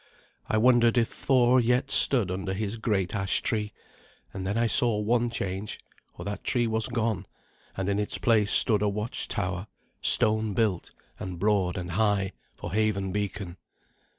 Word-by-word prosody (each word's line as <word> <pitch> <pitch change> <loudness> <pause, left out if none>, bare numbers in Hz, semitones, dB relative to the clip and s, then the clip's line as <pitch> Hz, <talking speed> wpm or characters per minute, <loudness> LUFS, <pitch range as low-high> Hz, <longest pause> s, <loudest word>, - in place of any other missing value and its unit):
I 110 - -1
wondered 120 0 +3
if 115 -1 +1
Thor 130 -1 +2
yet 125 +3 0
stood 115 -9 +4
under 95 +1 -4
his 105 +2 -4
great 100 -5 -2
ash 95 -2 -2
tree; 105 -2 -2 0.6
and 95 -1 -6
then 100 +3 -2
I 120 - +1
saw 120 -1 +4
one 120 +3 0
change, 100 -2 -5 0.4
for 85 - -8
that 100 +2 -6
tree 120 -2 0
was 110 -1 0
gone, 115 -6 -3 0.5
and 95 -1 -3
in 100 0 -1
its 105 - +2
place 110 -3 +1
stood 105 -4 +7
a 105 - +1
watchtower, 100 -2 -4 0.3
stone 110 -1 +3
built, 105 -6 -1 0.3
and 90 -1 -7
broad 95 -2 0
and 90 -1 -6
high, 100 0 0 0.2
for - - -8
haven 105 -3 -1
beacon. 100 -2 -5
105 Hz, 160 wpm, -26 LUFS, 95-115 Hz, 0.6 s, stood